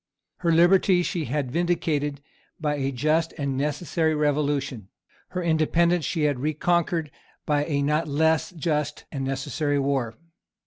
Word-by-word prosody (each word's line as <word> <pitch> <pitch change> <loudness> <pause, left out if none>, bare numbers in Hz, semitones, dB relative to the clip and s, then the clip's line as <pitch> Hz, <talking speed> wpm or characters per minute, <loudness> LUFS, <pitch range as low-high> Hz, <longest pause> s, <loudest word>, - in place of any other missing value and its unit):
Her 170 -2 +1
liberty 180 +2 +4
she 170 -3 -2
had 130 0 -2
vindicated 150 -4 -1 0.4
by 150 -2 0
a 135 -1 -1
just 155 +5 0
and 140 -3 -2
necessary 155 +3 0
revolution. 145 -6 0 0.4
Her 180 -1 -3
independence 170 +1 +2
she 160 +1 -1
had 145 -4 +1
reconquered 160 +1 0 0.3
by 145 -1 +1
a 140 -3 0
not 150 +3 +1
less 160 +2 +2
just 150 -4 -2
and 135 -2 -4
necessary 135 +2 -1
war. 135 -5 0
150 Hz, 135 wpm, -25 LUFS, 140-165 Hz, 0.4 s, liberty